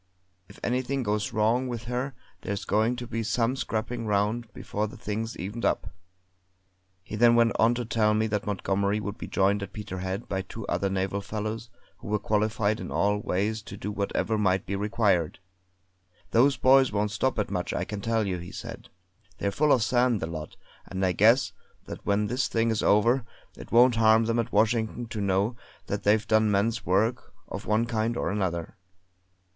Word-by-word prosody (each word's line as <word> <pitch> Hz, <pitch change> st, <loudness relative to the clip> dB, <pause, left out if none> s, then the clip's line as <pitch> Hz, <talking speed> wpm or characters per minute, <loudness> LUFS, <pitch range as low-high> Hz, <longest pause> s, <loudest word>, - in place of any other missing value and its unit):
If 100 Hz, -, -14 dB
anything 130 Hz, +2 st, -1 dB
goes 105 Hz, -1 st, -1 dB
wrong 115 Hz, +4 st, +2 dB
with 120 Hz, -2 st, -4 dB
her 125 Hz, +3 st, -3 dB, 0.3 s
there's 100 Hz, -2 st, -4 dB
going 110 Hz, +5 st, +2 dB
to 120 Hz, 0 st, -6 dB
be 115 Hz, -1 st, -3 dB
some 115 Hz, +3 st, 0 dB
scrapping 115 Hz, -2 st, -3 dB
round 105 Hz, +3 st, 0 dB
before 105 Hz, +1 st, -3 dB
the 105 Hz, -, -11 dB
thing's 110 Hz, +3 st, -4 dB
evened 105 Hz, +7 st, -5 dB
up!" -, -, 0 dB, 1.1 s
He 105 Hz, -, -7 dB
then 120 Hz, +2 st, +5 dB
went 115 Hz, -1 st, +4 dB
on 115 Hz, +2 st, +4 dB
to 120 Hz, 0 st, -3 dB
tell 110 Hz, -1 st, +2 dB
me 110 Hz, +1 st, +2 dB
that 105 Hz, -2 st, -2 dB
Montgomery 100 Hz, +1 st, 0 dB
would 105 Hz, 0 st, -5 dB
be -, -, -6 dB
joined 100 Hz, +1 st, +2 dB
at 100 Hz, 0 st, -6 dB
Peterhead 95 Hz, -1 st, -5 dB
by 95 Hz, -1 st, -2 dB
two 100 Hz, +3 st, -8 dB
other 100 Hz, -, 0 dB
naval 95 Hz, +1 st, -1 dB
fellows 110 Hz, +3 st, -4 dB, 0.3 s
who -, -, -10 dB
were 105 Hz, 0 st, +1 dB
qualified 110 Hz, +1 st, 0 dB
in -, -, -6 dB
all 105 Hz, +1 st, +1 dB
ways 105 Hz, +3 st, -1 dB
to -, -, -10 dB
do 105 Hz, -, -4 dB
whatever 105 Hz, +2 st, -1 dB
might 95 Hz, -2 st, +1 dB
be 100 Hz, -, -3 dB
required. 100 Hz, -5 st, +1 dB, 0.9 s
"Those 135 Hz, +5 st, +4 dB
boys 135 Hz, 0 st, +5 dB
won't 105 Hz, 0 st, 0 dB
stop 130 Hz, +4 st, 0 dB
at 105 Hz, -2 st, -1 dB
much, 90 Hz, -2 st, -2 dB
I -, -, -1 dB
can 100 Hz, +2 st, -5 dB
tell 115 Hz, 0 st, 0 dB
you," 90 Hz, -2 st, -2 dB
he 85 Hz, +1 st, -9 dB
said. -, -, -8 dB, 0.5 s
"They're 100 Hz, -, -1 dB
full 150 Hz, +6 st, +2 dB
of 125 Hz, -5 st, +4 dB
sand, 120 Hz, -1 st, +2 dB
the -, -, -2 dB
lot; 80 Hz, -2 st, -7 dB, 0.3 s
and 95 Hz, 0 st, -1 dB
I 90 Hz, -, +2 dB
guess 115 Hz, +7 st, +4 dB, 0.3 s
that -, -, -8 dB
when 100 Hz, +1 st, +1 dB
this 125 Hz, +4 st, 0 dB
thing 115 Hz, 0 st, +1 dB
is 110 Hz, -, 0 dB
over, 115 Hz, +5 st, +3 dB, 0.3 s
it -, -, -12 dB
won't 120 Hz, 0 st, +6 dB
harm 110 Hz, 0 st, +5 dB
them 115 Hz, +1 st, +1 dB
at 115 Hz, +1 st, -2 dB
Washington 110 Hz, +2 st, +1 dB
to 110 Hz, -, -4 dB
know 100 Hz, +4 st, +1 dB, 0.3 s
that 100 Hz, -, -3 dB
they've 105 Hz, +1 st, +2 dB
done 110 Hz, 0 st, +3 dB
men's 105 Hz, +2 st, 0 dB
work 105 Hz, +4 st, 0 dB
of 100 Hz, -, -7 dB
one 110 Hz, +2 st, +2 dB
kind 115 Hz, 0 st, -1 dB
or -, -, -1 dB
another." 85 Hz, -5 st, -2 dB
110 Hz, 190 wpm, -27 LUFS, 100-115 Hz, 1.1 s, won't